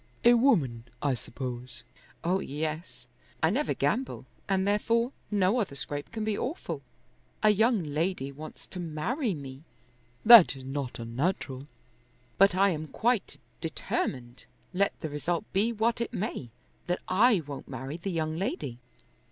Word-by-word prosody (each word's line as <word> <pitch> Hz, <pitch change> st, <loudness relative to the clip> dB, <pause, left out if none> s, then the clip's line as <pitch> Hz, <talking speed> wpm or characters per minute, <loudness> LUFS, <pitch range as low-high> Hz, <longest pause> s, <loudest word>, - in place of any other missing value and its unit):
A 240 Hz, -, +9 dB
woman, 165 Hz, -, +3 dB, 0.2 s
I 140 Hz, -2 st, +2 dB
suppose." 120 Hz, 0 st, -6 dB, 0.4 s
"Oh, 185 Hz, +3 st, +2 dB
yes. 155 Hz, -2 st, -4 dB, 0.4 s
I 160 Hz, -, +5 dB
never 285 Hz, +8 st, 0 dB
gamble, 255 Hz, +4 st, -1 dB, 0.2 s
and 190 Hz, 0 st, +2 dB
therefore 230 Hz, +4 st, +2 dB, 0.2 s
no 205 Hz, +3 st, +2 dB
other 195 Hz, -11 st, -2 dB
scrape 145 Hz, +1 st, -4 dB
can 220 Hz, -1 st, -3 dB
be 215 Hz, -1 st, 0 dB
awful. 270 Hz, -, -4 dB, 0.6 s
A 215 Hz, -, +7 dB
young 220 Hz, -1 st, +3 dB
lady 150 Hz, -1 st, -1 dB
wants 155 Hz, +3 st, -10 dB
to 185 Hz, -, -8 dB
marry 180 Hz, -, -1 dB
me." 135 Hz, -2 st, -8 dB, 0.6 s
"That 225 Hz, -10 st, +10 dB
is 135 Hz, -, -10 dB
not 135 Hz, -1 st, -4 dB
unnatural." 130 Hz, +3 st, -2 dB, 0.7 s
"But 195 Hz, -1 st, +6 dB
I 195 Hz, +1 st, +4 dB
am 155 Hz, -2 st, -3 dB
quite 235 Hz, +5 st, 0 dB, 0.2 s
determined, 130 Hz, -6 st, -3 dB, 0.3 s
let 200 Hz, +2 st, +1 dB
the 160 Hz, -, -3 dB
result 170 Hz, +6 st, -1 dB
be 210 Hz, +5 st, +3 dB
what 230 Hz, +1 st, 0 dB
it 235 Hz, -, -2 dB
may, 180 Hz, -, -3 dB, 0.4 s
that 180 Hz, 0 st, -1 dB
I 205 Hz, -1 st, +4 dB
won't 140 Hz, -1 st, -7 dB
marry 130 Hz, +4 st, -5 dB
the 175 Hz, +3 st, -4 dB
young 160 Hz, -3 st, -1 dB
lady." 145 Hz, -8 st, -3 dB
170 Hz, 145 wpm, -29 LUFS, 140-215 Hz, 0.7 s, That